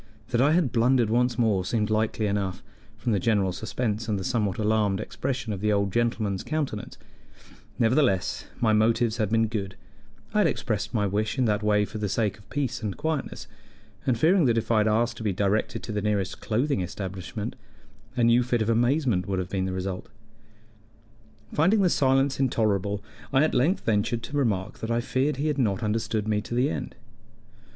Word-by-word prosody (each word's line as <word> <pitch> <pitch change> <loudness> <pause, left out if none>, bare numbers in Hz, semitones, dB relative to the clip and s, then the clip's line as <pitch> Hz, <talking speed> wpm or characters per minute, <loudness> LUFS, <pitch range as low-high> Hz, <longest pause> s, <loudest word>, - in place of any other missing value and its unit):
That 120 -1 +2
I 145 +3 +4
had 165 -6 +2
blundered 120 -1 +3
once 125 +1 +2
more 110 -6 +2
seemed 105 +2 -1
likely 110 0 0
enough, 100 -2 -2 0.3
from 120 +2 -2
the 100 - +2
general 100 -2 +2
suspense 110 +2 -3
and 105 -2 0
the - - -4
somewhat 105 -2 0
alarmed 105 -2 +1
expression 125 0 -3
of 95 - -6
the 105 0 +2
old 100 -2 +1
gentleman's 115 -5 0
countenance; 145 -9 -3 0.8
nevertheless, 115 -6 +2
my 110 -2 +3
motives 115 +1 +2
had 110 -3 0
been 115 +1 +3
good: 100 -3 -4 0.6
I - - +2
had - - +5
expressed - - -2
my 105 -2 +1
wish 105 +5 -1
in 130 - +2
that 105 -2 +1
way 105 -1 +2
for 110 - -7
the 105 -1 -1
sake 105 0 -1
of 105 - -20
peace 140 -3 -2
and 105 -3 -3
quietness, 160 -3 -3 0.6
and 125 -3 +2
fearing 165 - +4
that 115 -2 +3
if 115 0 -1
I 110 - +4
had 105 - +2
asked 115 +2 +1
to - - -6
be 105 -3 0
directed 100 +3 0
to - - -5
the 105 0 -1
nearest 100 -2 -1
clothing 120 +1 0
establishment, 95 +3 -5 0.6
a 120 - +3
new 120 +1 +5
fit 120 -2 0
of 110 - +1
amazement 120 - +2
would 95 -1 -1
have 90 -1 -3
been 95 -1 -1
the 95 - -2
result. 95 0 -4 1.4
Finding 190 +7 +3
the 180 - +3
silence 135 0 +2
intolerable, 105 -6 0 0.3
I 135 +2 +4
at 155 - +1
length 140 +10 +1
ventured 115 +2 0
to 145 - -6
remark 105 -8 -1
that 110 - -4
I 115 0 +1
feared 130 +4 0
he 145 - -2
had 150 -2 0
not 110 -2 +1
understood 110 0 -1
me 105 -1 +1
to 120 - -5
the 130 +4 +2
end. - - -5
110 Hz, 195 wpm, -26 LUFS, 105-125 Hz, 1.4 s, had